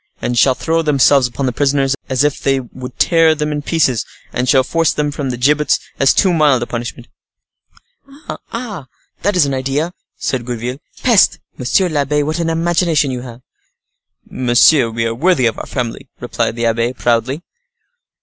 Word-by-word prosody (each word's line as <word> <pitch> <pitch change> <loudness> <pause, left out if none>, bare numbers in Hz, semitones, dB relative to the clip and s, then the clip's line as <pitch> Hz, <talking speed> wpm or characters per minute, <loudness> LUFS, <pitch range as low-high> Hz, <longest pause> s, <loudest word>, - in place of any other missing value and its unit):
and 125 - -2
shall 130 +2 +4
throw 165 +4 0
themselves 140 -3 +3
upon 130 +3 -4
the 125 - 0
prisoners 140 0 +1
as 130 +1 +1
if 150 -1 0
they 135 -1 +1
would 125 0 -10
tear 165 -2 +4
them 150 0 -2
in 150 0 -2
pieces, 145 -7 +1 0.3
and 125 0 -1
shall 130 -1 +5
force 165 +3 +1
them 150 -1 -1
from 145 -2 -4
the 125 - -3
gibbets, 145 +3 +2 0.2
as 140 - +5
too 190 -3 +2
mild 145 -6 +3
a - - -3
punishment." 120 0 -6 1.4
"Ah! 215 - -6 0.3
that 205 0 0
is 175 -5 +4
an 140 - -2
idea," 135 +6 -2 0.2
said 130 -2 -2
Gourville. 120 +2 -5 0.2
"Peste! 235 -6 +4 0.2
monsieur 135 +9 +1
l'abbe, 150 -2 0
what 155 +3 -2
an 165 -1 0
imagination 165 -3 +1
you 125 -1 -4
have!" 120 -1 -10 0.9
"Monsieur, 125 +1 +3
we 115 0 -2
are 115 - -1
worthy 155 +1 +2
of 115 - 0
our - - -7
family," 125 +1 -4
replied 115 -2 -2
the 115 0 -2
abbe, 115 +2 0
proudly. 125 +5 -1
135 Hz, 175 wpm, -16 LUFS, 125-155 Hz, 1.4 s, shall